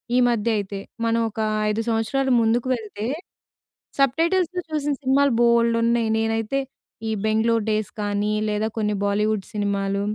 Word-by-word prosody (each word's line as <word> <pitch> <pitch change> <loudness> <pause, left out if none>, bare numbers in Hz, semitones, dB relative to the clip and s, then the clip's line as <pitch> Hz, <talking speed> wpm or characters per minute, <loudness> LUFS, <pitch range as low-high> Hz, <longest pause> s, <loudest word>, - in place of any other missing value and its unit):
ఈ - - +4
మధ్య 230 -1 0
అయితే. 200 -1 -4 0.3
మనం 230 0 +2
ఒక 220 - -9 0.3
5 215 +2 0
సంవత్సరాలు 240 +4 0
ముందుకు 230 +3 +1
వెళ్తే, 215 -2 -6 0.9
సబ్‌టైటిల్స్‌తో 335 +6 +2
చూసిన 295 -1 0
సినిమాలు 275 +1 +3
బొల్డు 235 -1 +4
ఉన్నాయి. 235 -1 +2
నేనైతే 225 +4 0 0.5
ఈ - - 0
'బెంగుళూరు 220 +1 +2
డేస్' 215 -1 -1
గానీ, 205 +1 0 0.2
లేదా 210 +1 0
కొన్ని 210 -1 0
బాలీవుడ్ 210 0 0
సినిమాలు, 200 -1 -1
225 Hz, 135 wpm, -23 LUFS, 210-245 Hz, 0.9 s, ఈ